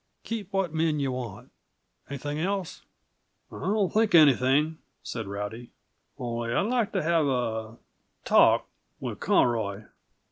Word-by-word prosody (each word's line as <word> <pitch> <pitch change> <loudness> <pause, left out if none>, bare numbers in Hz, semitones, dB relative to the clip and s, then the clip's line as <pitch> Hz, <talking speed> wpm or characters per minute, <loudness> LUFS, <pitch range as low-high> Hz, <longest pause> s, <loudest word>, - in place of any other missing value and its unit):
"Keep 215 -4 -5
what 195 -5 -1
men 160 -1 +1
yuh 135 -2 0
want. 125 -6 -7 0.6
Anything 145 +2 -4
else?" 190 +1 -2 0.7
"I - - -8
don't 195 -2 0
think 220 -3 +3
of 165 - +10
anything," 145 +3 +3 0.2
said 115 -4 -5
Rowdy. 105 +4 -6 0.5
"Only 120 -1 -3
I'd - - +3
like 230 0 0
to 190 - 0
have 165 -2 +2
a 115 -3 -2 0.5
talk - - +5 0.3
with - - -5
Conroy." 110 -4 +1
145 Hz, 135 wpm, -27 LUFS, 120-180 Hz, 0.7 s, of